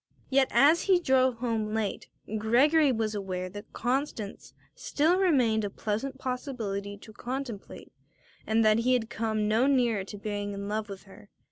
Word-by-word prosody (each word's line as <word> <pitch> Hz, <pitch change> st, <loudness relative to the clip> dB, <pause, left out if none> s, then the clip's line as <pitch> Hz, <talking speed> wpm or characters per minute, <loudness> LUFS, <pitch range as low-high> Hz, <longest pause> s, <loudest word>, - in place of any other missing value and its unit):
Yet 265 Hz, 0 st, +4 dB
as 310 Hz, +4 st, +4 dB
he 375 Hz, -3 st, +4 dB
drove 260 Hz, -5 st, +3 dB
home 225 Hz, -3 st, -2 dB
late 215 Hz, -3 st, -2 dB, 0.3 s
Gregory 275 Hz, +7 st, +4 dB
was 220 Hz, -2 st, -1 dB
aware 185 Hz, -3 st, -4 dB
that 205 Hz, +2 st, -10 dB
Constance 245 Hz, -4 st, -3 dB, 0.2 s
still 330 Hz, +5 st, +1 dB
remained 250 Hz, -, +3 dB
a 205 Hz, -, -2 dB
pleasant 225 Hz, +7 st, -3 dB
possibility 225 Hz, -7 st, -4 dB
to 220 Hz, +2 st, -14 dB
contemplate 245 Hz, -3 st, -7 dB, 0.5 s
and 220 Hz, 0 st, +2 dB
that 215 Hz, +1 st, +4 dB
he 250 Hz, +2 st, +2 dB
had 235 Hz, -2 st, 0 dB
come 220 Hz, -2 st, -1 dB
no 225 Hz, +5 st, +3 dB
nearer 240 Hz, -7 st, +2 dB
to 205 Hz, -, -9 dB
being 205 Hz, 0 st, -4 dB
in 200 Hz, 0 st, -5 dB
love 215 Hz, +1 st, -3 dB
with 195 Hz, -1 st, -8 dB
her. 200 Hz, +1 st, -16 dB
225 Hz, 160 wpm, -28 LUFS, 205-260 Hz, 0.5 s, Yet